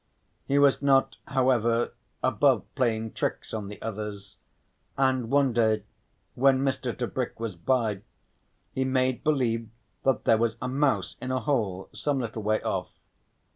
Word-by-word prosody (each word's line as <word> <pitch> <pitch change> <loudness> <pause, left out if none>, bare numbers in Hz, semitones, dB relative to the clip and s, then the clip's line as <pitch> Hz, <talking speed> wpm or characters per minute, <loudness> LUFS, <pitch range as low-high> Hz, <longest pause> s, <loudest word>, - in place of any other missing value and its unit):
He 140 - +2
was 140 -1 +4
not, 135 -1 +3
however, 120 -3 +2 0.3
above - - +3
playing 115 -4 0
tricks - - -3
on 105 -3 -3
the 105 - -9
others, 105 -2 -6 0.6
and 130 -3 +2
one 140 -2 +3
day 110 -3 +2 0.5
when 135 +1 +3
Mr. 130 -3 -1
Tebrick 125 0 -3
was 115 -5 -3
by, 110 +2 0 0.7
he 130 - -1
made 130 -1 +1
believe 120 -7 +1 0.3
that 135 -3 +1
there 110 - +5
was 115 -1 0
a 125 - -3
mouse 135 +2 0
in 130 - -4
a 130 0 0
hole 105 -8 -1
some 145 -2 -1
little 115 -2 -4
way 110 +1 0
off. - - -2
120 Hz, 145 wpm, -27 LUFS, 110-135 Hz, 0.7 s, there